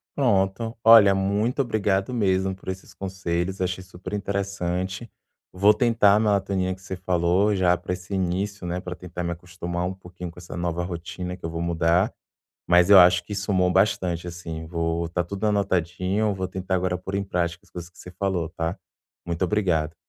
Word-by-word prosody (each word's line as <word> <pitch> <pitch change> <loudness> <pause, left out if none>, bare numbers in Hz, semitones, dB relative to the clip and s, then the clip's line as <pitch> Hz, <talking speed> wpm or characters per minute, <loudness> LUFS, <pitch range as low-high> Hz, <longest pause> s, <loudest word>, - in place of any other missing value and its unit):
Pronto. 115 -2 +1
Olha, 110 -3 +8
muito 100 +7 0
obrigado 105 -4 0
mesmo 95 -4 +1
por 95 - -9
esses 95 0 -7
conselhos, 95 -1 -3
achei 90 0 -2
superinteressante. 95 +1 -3 0.4
Vou 100 +3 +5
tentar 115 -3 +4
a - - +3
melatonina 100 -3 +1
que 95 - -20
você 95 0 -6
falou 90 +3 +1
já 90 -2 +3
pra 90 - -4
esse 90 +2 -7
início, 95 +2 -2
né, 90 +1 -2
para 90 -1 -6
tentar 90 -1 -7
me 85 - -2
acostumar 85 0 -4
um 90 - -2
pouquinho 90 -1 -9
com 85 - -14
essa 85 0 -8
nova 85 0 -2
rotina 90 +1 -5
que 90 - -9
eu - - -2
vou 85 0 -4
mudar, 85 +3 +2 0.6
mas 90 +1 +5
eu 100 - +11
acho 90 0 +6
que 95 - -7
somou 95 -3 +1
bastante 90 -3 +1
assim. 80 -2 -6
Vou 85 0 -1
está 85 +1 -1
tudo 100 +5 -3
anotadinho, 95 +1 0
vou 95 -1 -3
tentar 95 0 -3
agora 90 0 0
pôr 95 +2 -6
em 100 - 0
prática 85 -2 -2
as - - -25
coisas 85 -1 -8
que 90 - -26
você 90 - -11
falou, 90 -3 -2
tá? 85 +1 -3 0.5
Muito 85 +1 -2
obrigado. 90 -6 +1
95 Hz, 180 wpm, -24 LUFS, 90-100 Hz, 0.6 s, eu